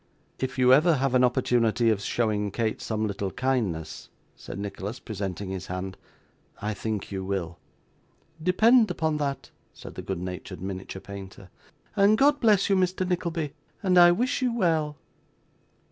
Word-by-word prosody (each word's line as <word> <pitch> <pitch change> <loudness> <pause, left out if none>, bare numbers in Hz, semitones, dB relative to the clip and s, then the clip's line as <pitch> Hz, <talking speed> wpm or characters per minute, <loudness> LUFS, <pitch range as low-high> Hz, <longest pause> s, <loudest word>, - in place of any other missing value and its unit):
'If 130 0 -3
you 125 0 +6
ever 155 +4 +5
have 135 -1 0
an 130 0 +4
opportunity 120 -2 +2
of 105 -2 -1
showing 105 -2 0
Kate 110 +2 -2
some 110 -1 -2
little 100 -1 -2
kindness,' 100 -11 -2 0.3
said - - -9
Nicholas, 100 +3 -5
presenting 100 -3 -5
his 95 -1 -5
hand, 90 +1 -4 0.6
'I 105 +1 -2
think 105 -1 -4
you 95 -1 -3
will.' 90 -3 -3 0.8
'Depend 220 +6 +5
upon 160 -3 0
that,' 140 -2 -3 0.2
said - - -10
the - - -6
good 95 - -4
natured 90 +1 -6
miniature 95 0 -6
painter; 95 -1 -10 0.4
'and 205 +1 +5
God 290 +3 +4
bless 210 -6 +4
you, 195 - +3
Mr. 185 0 +1
Nickleby; 170 -4 -2 0.3
and 185 -2 +3
I 175 -1 +8
wish 250 +10 0
you 250 -1 +2
well. 160 -9 0
120 Hz, 155 wpm, -26 LUFS, -, 0.8 s, I